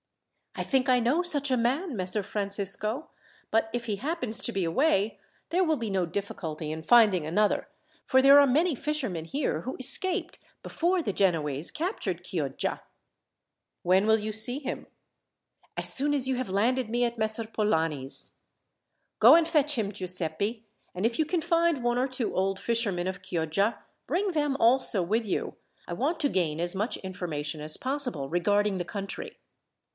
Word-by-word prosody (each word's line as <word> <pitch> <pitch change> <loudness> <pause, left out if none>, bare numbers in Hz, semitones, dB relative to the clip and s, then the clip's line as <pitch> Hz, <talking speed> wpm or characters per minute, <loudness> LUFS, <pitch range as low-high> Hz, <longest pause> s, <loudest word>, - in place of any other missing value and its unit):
"I - - -3
think 265 -2 0
I 250 -1 +4
know 250 +9 +1
such 290 -6 +2
a - - +4
man, 265 +7 -1
Messer 185 +1 0
Francisco; 200 +6 -1 0.4
but 225 0 +1
if 240 0 -3
he 210 -3 -2
happens 255 - -2
to 235 - -3
be 195 -4 -1
away, 210 - +1 0.3
there 365 +2 +2
will 320 -3 +1
be 230 -4 -4
no 190 -2 0
difficulty 165 -4 -5
in 160 0 -5
finding 205 -4 +4
another, 210 - 0 0.3
for 260 - +3
there 275 +2 +8
are 285 - +5
many 310 +5 +2
fishermen 255 - -3
here 275 - -2
who 260 - -6
escaped 360 +6 +3 0.2
before 350 +2 0
the 205 - -2
Genoese 160 -6 +1
captured 215 - -3
Chioggia." 145 -8 -3 1.0
"When 185 +4 +3
will 220 0 +5
you 215 +1 -4
see 220 +4 +1
him?" 270 - -6 0.9
"As - - +5
soon 290 +2 +3
as 265 -2 +2
you 265 - 0
have 255 -4 -4
landed 230 +5 0
me 240 +2 +1
at 235 0 -4
Messer 220 +1 -1
Polani's." 160 -11 -1 0.8
"Go - - +8
and 335 -1 +3
fetch 300 -4 +2
him, 205 -3 -1
Giuseppi; 185 +3 -3 0.3
and 185 +4 -2
if 230 0 0
you 315 - +1
can 340 +2 -1
find 335 -4 +1
one 240 0 +1
or 260 - +1
two 255 -3 -3
old 190 +1 0
fishermen 205 -7 0
of 190 - -5
Chioggia, 170 +6 -1 0.3
bring 390 +2 0
them 295 -4 0
also 235 -4 +3
with 220 +6 -1
you. 195 - -3 0.3
I - - -5
want 290 - -1
to 285 - +2
gain 165 - -1
as 175 +2 -2
much 210 +5 -2
information 160 -6 -5
as 155 0 0
possible 255 - -2
regarding 205 +3 +1
the 175 - -3
country." 195 +1 -6
220 Hz, 170 wpm, -27 LUFS, 185-270 Hz, 1.0 s, there